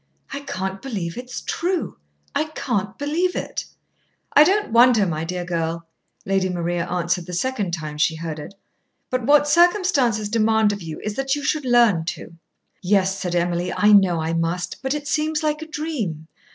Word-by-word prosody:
"I 280 - -3
can't 190 -8 -4
believe 195 -11 -4
it 250 - -6
is - - -5
true! 350 - -2 0.3
I 310 - +1
can't 235 -10 -3
believe 325 +6 0
it!" - - -4 0.7
"I 295 - +8
don't 390 - +1
wonder, 235 -2 +6
my 160 -3 -2
dear 180 +1 -4
girl," 165 -1 -2 0.4
Lady 190 -1 +1
Maria 175 -1 -2
answered 175 0 -1
the 180 - -7
second 210 -1 -1
time 155 -2 -7
she 160 - +2
heard 160 -1 -5
it. 175 +6 -9 0.6
"But 255 -2 -1
what 290 0 +5
circumstances 315 - +3
demand 220 -1 +2
of 200 - -6
you 160 -2 -7
is 215 - -2
that 270 +1 0
you 290 - -5
should 300 0 0
learn 235 -9 +4
to." 170 - -6 0.5
"Yes," 190 0 +1
said 180 -1 -2
Emily, 175 +1 0
"I 210 0 +3
know 190 -4 +5
I 160 +1 -2
must. 165 +2 -2
But 265 +2 -1
it 290 -1 -5
seems 305 +1 0
like 305 0 0
a 315 - -7
dream. 250 - -4
205 Hz, 180 wpm, -22 LUFS, 175-285 Hz, 0.7 s, I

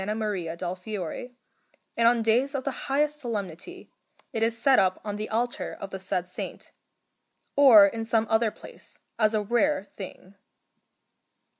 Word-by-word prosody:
Maria 195 -7 -3
del 180 +1 -3
Fiore, 195 +4 -6 0.6
and 230 0 +4
on 235 -1 +3
days 250 +6 +2
of 265 - -2
the 275 - -1 0.2
highest 295 +2 +1
solemnity 230 - -6 0.4
it 225 - -2
is 225 0 +1
set 265 +3 +4
up 185 -1 +2
on 205 -1 -3
the 215 +1 -5
altar 240 +2 -2
of 195 - -7
the 190 - -5
said 180 -1 -2
Saint, 180 - -7 0.8
or 255 -8 +9
in 225 +3 -2
some 225 0 +1
other 220 +1 +2
place, - - -11 0.2
as 215 0 +3
a 210 - +1
rare 240 +4 +1
thing. 190 -1 -11
220 Hz, 155 wpm, -26 LUFS, 195-245 Hz, 0.8 s, or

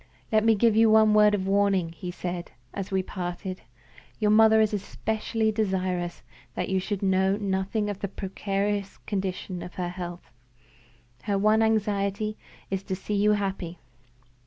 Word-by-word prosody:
"Let 215 -1 +4
me 225 0 +5
give 225 +1 +3
you 225 0 +6
one 215 0 +6
word 210 0 +6
of 190 -2 -2
warning," 195 -3 +2
he 175 +2 -7
said, 175 -1 -5 0.2
as 195 -1 -4
we 190 -1 0
parted. 185 0 -5 0.6
"Your 210 -1 +2
mother 220 0 +6
is 215 -1 +3
especially 220 +2 -1
desirous 185 -4 -1 0.3
that - - -2
you 190 0 +2
should 200 +1 -3
know 190 +1 +2
nothing 200 +1 -1
of 205 -2 -4
the 200 - -2
precarious 200 +1 -2
condition 190 -2 -3
of 180 - -9
her 180 -1 -2
health. 175 -3 -7 0.9
Her 200 -2 +1
one 215 +2 +4
anxiety 210 -1 0 0.4
is 195 -1 -1
to 190 - -2
see 195 +3 -5
you 205 +1 +4
happy. 195 -4 -3
200 Hz, 160 wpm, -26 LUFS, 185-215 Hz, 0.9 s, you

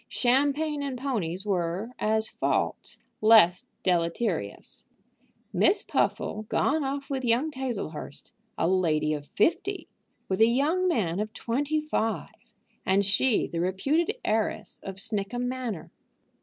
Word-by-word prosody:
Champagne 285 +4 +1
and 275 -3 -3
ponies 205 -9 -2
were, 185 +3 -1
as 220 +1 +1
faults, - - -1 0.2
less 215 -5 +6 0.2
deleterious. 170 - -1 0.7
Miss - - +4
Puffle 215 0 -1
gone 310 +1 +1
off 275 +1 -3
with 265 -1 -2
young 245 +6 +2
Tazlehurst, 235 - -5 0.3
a 165 - +1
lady 160 -5 +2
of 145 -1 -5
fifty, 360 - 0 0.4
with 190 +2 -1
a 225 - +8
young 300 +10 +2
man 195 - 0
of 215 0 -2
twenty 290 +6 -1
five! 255 -7 -2 0.5
and 195 +1 +2
she 210 +4 +2
the 170 - -4
reputed 280 - +1
heiress 215 0 -1
of 195 - -6
Snickham 210 +5 -2
Manor! 245 -8 -4
225 Hz, 125 wpm, -27 LUFS, 190-275 Hz, 0.7 s, a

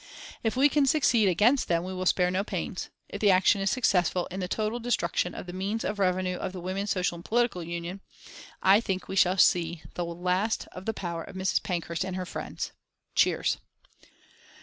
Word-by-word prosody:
"If 225 0 -1
we 275 +2 +6
can 290 -1 +2
succeed 240 -8 +4
against 230 +9 +3
them 170 -1 +1
we 185 +1 -5
will 185 0 -2
spare 180 -1 +3
no 190 +2 0
pains. - - -4 0.2
If - - -7
the 205 - +5
action 190 +1 +4
is 195 - +2
successful 180 -7 +2
in 185 - -4
the 180 - -2
total 215 +4 -1
destruction 180 -7 0
of - - -6
the 175 - -8
means 200 +4 -2
of 210 - -3
revenue 185 -1 +1
of 185 - -4
the 185 - -6
Women's 190 +3 -3
Social 180 -2 0
and 170 - -11
Political 230 -7 0
Union 170 +3 -5 0.6
I 195 +3 +6
think 190 -4 -3
we - - -5
shall 185 0 +4
see 170 -3 +3
the 175 - -2
last 180 +5 -1
of 185 +1 -9
the 225 - 0
power 170 -3 -4
of - - -11
Mrs. 190 0 +1
Pankhurst 170 0 -2
and 185 -1 -4
her 185 -1 -3
friends." - - -5 0.4
(Cheers.) - - +2
185 Hz, 200 wpm, -28 LUFS, 180-210 Hz, 0.6 s, we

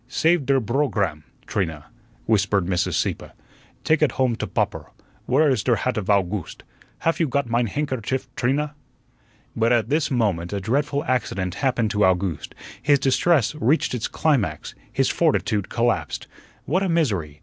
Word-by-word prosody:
"Save 160 +2 +1
der 135 -1 +4
brogramme, 110 - -1 0.2
Trina," 80 -7 -3 0.4
whispered 100 -3 +2
Mrs. 90 -1 0
Sieppe. - - -2 0.5
"Take 155 -1 +2
ut 155 - +3
home 130 -3 +1
to - - -3
popper. - - -2 0.4
Where 150 +5 +4
is 130 -7 +2
der 120 +3 +2
hat 125 +4 -1
of 105 -4 -3
Owgooste? 100 -2 0 0.4
Haf 165 +2 +1
you 165 - +2
got 140 0 0
mein 120 +1 +1
handkerchief, 130 0 -2
Trina?" 145 +4 0 0.8
But 115 +1 +2
at 120 -2 +2
this 150 +1 +1
moment 100 -9 0
a 100 - -1
dreadful 140 +7 0
accident 95 -7 -1
happened 120 -4 0
to 105 -1 +1
Owgooste; 95 -3 0 0.3
his 145 +2 +4
distress 135 +1 +2
reached 150 0 +1
its 120 -3 -2
climax; 115 - 0 0.2
his - - +1
fortitude 105 -3 +1
collapsed. 120 0 -1 0.4
What 180 +6 +1
a 195 - 0
misery! 100 - 0
120 Hz, 155 wpm, -23 LUFS, 100-140 Hz, 0.8 s, der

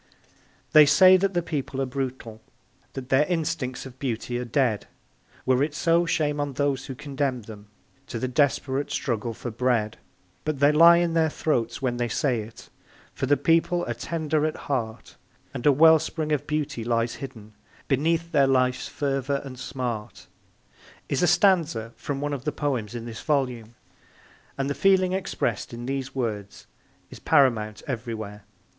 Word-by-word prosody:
They 150 -1 +8
say 185 +5 +7
that 195 0 0
the 175 - +1
people 140 -4 -4
are 135 - +1
brutal 125 -4 -5 0.5
That 130 -1 -7
their 135 +3 +4
instincts 160 -7 -2
of 130 -1 -12
beauty 120 -1 -3
are 125 - -4
dead 120 -3 0 0.6
Were 130 0 +3
it 145 +1 -1
so, 170 +1 +2
shame 150 -2 0
on 145 -1 -2
those 140 -1 -1
who 135 - -6
condemn 135 -3 -3
them 105 -1 -11 0.4
To - - -5
the 130 - -2
desperate 135 0 0
struggle 115 -2 -2
for 120 - -6
bread. 115 -2 0 0.4
But 155 -3 -2
they 145 +1 +5
lie 170 +3 +7
in 170 -1 +1
their 160 -1 +3
throats 120 -6 -1
when 120 -2 0
they 120 0 0
say 120 0 0
it, 110 +2 -12 0.4
For 135 - -3
the 145 +1 +4
people 165 +4 +2
are 120 - -2
tender 155 +4 -2
at 155 0 0
heart, 115 -6 -4 0.4
And 130 0 -2
a - - +8
wellspring 160 +1 +4
of 145 -1 -1
beauty 150 -6 -2
lies 115 0 0
hidden 110 -6 -9 0.3
Beneath 165 +4 0
their 140 -2 +4
life's 130 -1 +1
fever 140 -1 -1
and 130 -2 -9
smart, 125 -4 -5 0.8
is - - 0
a 175 - +4
stanza 165 - +2
from 140 -1 -4
one 145 0 -2
of 135 -3 -5
the 150 - -1
poems 125 -8 -2
in 115 -1 -5
this 115 -2 -7
volume, 125 -6 -1 0.8
and 135 0 -1
the 140 - -1
feeling 185 +1 +3
expressed 190 -8 -2
in 120 +1 -7
these 135 0 -4
words 105 -6 -4 0.5
is - - -10
paramount 115 -8 +2
everywhere. 110 -5 -5
135 Hz, 165 wpm, -25 LUFS, 120-150 Hz, 0.8 s, They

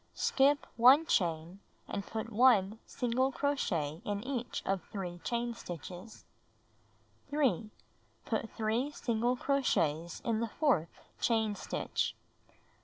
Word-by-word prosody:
Skip 285 +2 +3
1 260 +7 +7
chain, 170 - 0 0.3
and 200 - -3
put 225 +2 -5
1 220 -3 +4
single 255 +2 0
crochet 175 - -1
in 205 0 -3
each 250 -2 -3
of 195 -1 0
3 180 -4 -5
chain 235 +4 -2
stitches. 180 +1 -9 1.0
3. 260 - +1 0.6
Put 225 -1 -2
3 225 +5 0
single 240 -3 0
crochets 170 - 0
in 225 -2 0
the 230 0 -1
fourth 210 - 0 0.2
chain 220 -3 +2
stitch. 200 - -2
225 Hz, 110 wpm, -32 LUFS, 185-255 Hz, 1.0 s, 1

